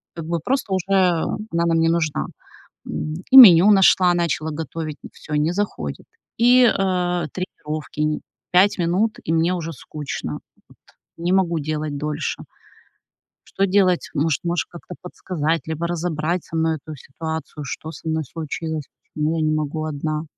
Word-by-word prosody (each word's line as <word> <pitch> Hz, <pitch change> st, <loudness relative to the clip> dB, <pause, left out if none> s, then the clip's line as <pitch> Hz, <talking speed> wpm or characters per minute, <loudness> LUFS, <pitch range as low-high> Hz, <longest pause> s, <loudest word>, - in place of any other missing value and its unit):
как 165 Hz, -2 st, -6 dB
бы 170 Hz, +1 st, -1 dB
просто 245 Hz, -, -1 dB
уже 185 Hz, -2 st, -1 dB
она 180 Hz, 0 st, +1 dB
нам 165 Hz, -1 st, +2 dB
не 165 Hz, 0 st, +3 dB
нужна. 165 Hz, -3 st, 0 dB, 0.6 s
М, 155 Hz, 0 st, -4 dB, 0.2 s
и 265 Hz, -, +7 dB
меню 200 Hz, -6 st, +10 dB
нашла, 190 Hz, -2 st, +5 dB
начала 160 Hz, -2 st, -1 dB
готовить, 155 Hz, 0 st, -5 dB, 0.2 s
всё, 150 Hz, -, -8 dB
не 150 Hz, +3 st, +1 dB
заходит. 175 Hz, -, -4 dB, 0.3 s
И, 245 Hz, +2 st, +6 dB
э, 180 Hz, -5 st, +1 dB
тренировки 155 Hz, -5 st, -6 dB
н 150 Hz, 0 st, 0 dB, 0.3 s
5 185 Hz, +3 st, +5 dB
минут, 185 Hz, +6 st, 0 dB
и 160 Hz, -, -1 dB
мне 165 Hz, +2 st, +2 dB
уже 165 Hz, -2 st, -4 dB
скучно, 150 Hz, 0 st, -6 dB, 0.3 s
вот, -, -, -21 dB, 0.4 s
не 170 Hz, +2 st, -1 dB
могу 180 Hz, -3 st, +2 dB
делать 150 Hz, 0 st, -3 dB
дольше. 150 Hz, 0 st, -3 dB, 1.0 s
Что 195 Hz, -, 0 dB
делать? 185 Hz, -2 st, +2 dB
Может, 155 Hz, +1 st, 0 dB
можешь 175 Hz, 0 st, -1 dB
как-то 175 Hz, +1 st, -10 dB
подсказать 165 Hz, -3 st, -2 dB
либо 160 Hz, +1 st, -3 dB
разобрать 170 Hz, 0 st, -2 dB
со -, -, -8 dB
мной 160 Hz, 0 st, +1 dB
эту 155 Hz, +1 st, -10 dB
ситуацию: 160 Hz, +2 st, -6 dB
что 155 Hz, +3 st, -6 dB
со 165 Hz, -, -10 dB
мной 160 Hz, 0 st, 0 dB
случилось, 160 Hz, +1 st, -5 dB, 0.3 s
почему 155 Hz, +2 st, 0 dB
я -, -, 0 dB
не 155 Hz, -, +1 dB
могу 155 Hz, +1 st, -2 dB
одна? 155 Hz, +1 st, -3 dB
165 Hz, 155 wpm, -22 LUFS, 155-180 Hz, 1.0 s, меню